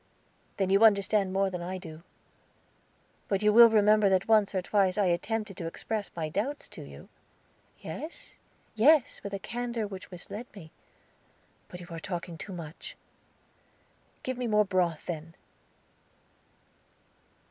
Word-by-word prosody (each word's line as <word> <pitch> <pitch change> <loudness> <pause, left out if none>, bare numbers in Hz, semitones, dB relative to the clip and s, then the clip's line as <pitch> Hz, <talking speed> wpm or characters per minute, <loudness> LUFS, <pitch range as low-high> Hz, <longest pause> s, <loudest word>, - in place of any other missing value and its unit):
"Then 190 -1 0
you 200 +3 +5
understand 200 -2 +4
more 195 0 +1
than 180 -1 -5
I 185 +2 -4
do. 165 -3 -10 1.3
But 195 0 -1
you 210 0 +4
will 235 +1 +9
remember 215 -1 +4
that 190 0 +1
once 210 -3 +3
or 185 - +1
twice 195 -1 +2
I 205 - +3
attempted 195 +3 -1
to 165 - -4
express 210 +5 -4
my 160 -2 -2
doubts 230 - -3
to - - -10
you?" - - -12 0.7
"Yes, 320 +2 -8 0.4
yes, 270 +5 +4
with 200 - -6
a 200 - -2
candor 235 +2 -3
which 195 -2 -8
misled 200 +6 -8
me. 160 -6 -12 1.0
But 180 - -10
you 175 - -10
are 165 - -5
talking 175 0 -5
too 200 - -7
much." 165 -3 -8 1.3
"Give 255 -1 -4
me 245 - -1
more 210 -1 +3
broth, 180 -5 0
then." 165 0 -6
195 Hz, 145 wpm, -29 LUFS, 180-215 Hz, 1.3 s, will